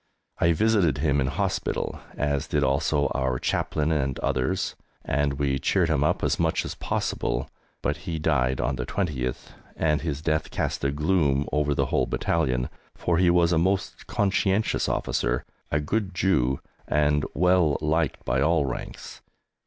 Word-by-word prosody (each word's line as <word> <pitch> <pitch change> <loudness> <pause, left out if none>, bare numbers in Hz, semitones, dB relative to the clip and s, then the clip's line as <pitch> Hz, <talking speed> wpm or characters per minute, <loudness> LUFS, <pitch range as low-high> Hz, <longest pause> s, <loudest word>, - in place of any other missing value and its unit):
I 85 0 +4
visited 100 -7 +2
him 70 -1 +1
in 65 - +1
hospital, 65 - -2 0.2
as 70 -1 0
did - - +1
also 70 +2 +1
our 65 -1 0
Chaplain 75 +4 0
and 70 -4 0
others, 65 -2 0 0.3
and 70 0 +1
we 70 -1 0
cheered 85 +5 +2
him 75 -3 +2
up 75 - +1
as - - +1
much - - +1
as - - -4
possible, - - -2 0.4
but 75 - 0
he 85 -1 -4
died 65 -5 +1
on 65 0 0
the 60 - -3
20th, 65 -10 -2 0.2
and 75 -1 +1
his 75 -3 -3
death 80 -1 0
cast - - -2
a 70 - +2
gloom 75 -2 +1
over 75 -1 +1
the - - +1
whole - - +2
battalion, 65 -7 0 0.3
for 85 -1 0
he 90 -1 +4
was 85 0 +4
a 80 - +3
most 95 +3 -1
conscientious 100 +1 +1
officer, - - -1 0.2
a 75 - +1
good 95 +5 -2
Jew, 65 -9 +1 0.3
and 75 0 +2
well 90 -2 +3
liked 80 0 0
by 65 +2 +1
all 75 0 +3
ranks. 65 - -6
75 Hz, 160 wpm, -26 LUFS, 70-85 Hz, 0.4 s, I